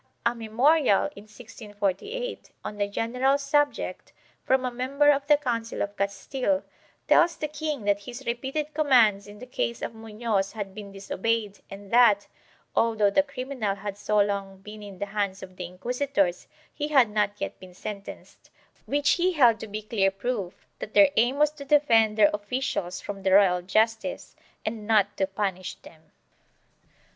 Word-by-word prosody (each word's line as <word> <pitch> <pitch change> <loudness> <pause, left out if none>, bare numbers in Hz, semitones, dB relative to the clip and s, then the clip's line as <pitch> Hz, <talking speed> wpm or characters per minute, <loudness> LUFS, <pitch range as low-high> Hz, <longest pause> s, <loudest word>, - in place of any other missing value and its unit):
A 235 - +3
memorial, 240 +3 +2
in 200 - -12
1648, 215 - -5 0.2
on 210 - -5
the 205 - +1
general 250 +6 +1
subject, 290 +1 -1 0.3
from 260 0 +2
a 250 - -1
member 275 +4 +3
of 280 0 -1
the 295 -1 +6
Council 230 -5 -2
of 205 0 -5
Castile, 250 +9 -1 0.4
tells 340 0 +5
the 305 - -2
king 300 -4 -4
that 200 0 +2
his 245 +6 -9
repeated 270 +6 -3
commands 240 -10 +4
in 205 0 -12
the 250 - -9
case 235 -2 -3
of - - -4
Munoz 220 -3 -2
had 205 -3 -6
been 205 -1 -9
disobeyed 205 +2 -2
and 195 0 -11
that, 230 -4 +5 0.5
although 220 -3 +3
the 290 - +4
criminal 255 -7 -3
had 200 0 -6
so 210 +1 0
long 200 -1 0
been 210 +2 -10
in 200 -2 -10
the 200 - -3
hands 200 -1 -3
of 185 -1 -11
the 180 - -6
inquisitors, 200 0 -1 0.3
he 295 0 -3
had 270 -5 +5
not 210 -1 0
yet - - -5
been 185 -1 -13
sentenced, 200 +1 -9 0.4
which 285 0 +2
he 365 +1 +2
held 245 -8 +5
to 220 - -7
be 210 +1 -6
clear 205 -3 +1
proof 195 -2 -4
that 215 - -7
their 295 -2 +7
aim 240 +5 +2
was 300 0 +4
to 300 -2 -10
defend 230 -7 +3
their 205 -2 +6
officials 205 -4 -3
from 200 -1 -7
the 190 0 +1
royal 190 -2 +5
justice 220 +5 -1 0.3
and 215 -1 -4
not 205 -2 +3
to 190 - 0
punish 190 -2 -3
them. 160 -1 -17
220 Hz, 170 wpm, -26 LUFS, 200-265 Hz, 0.5 s, their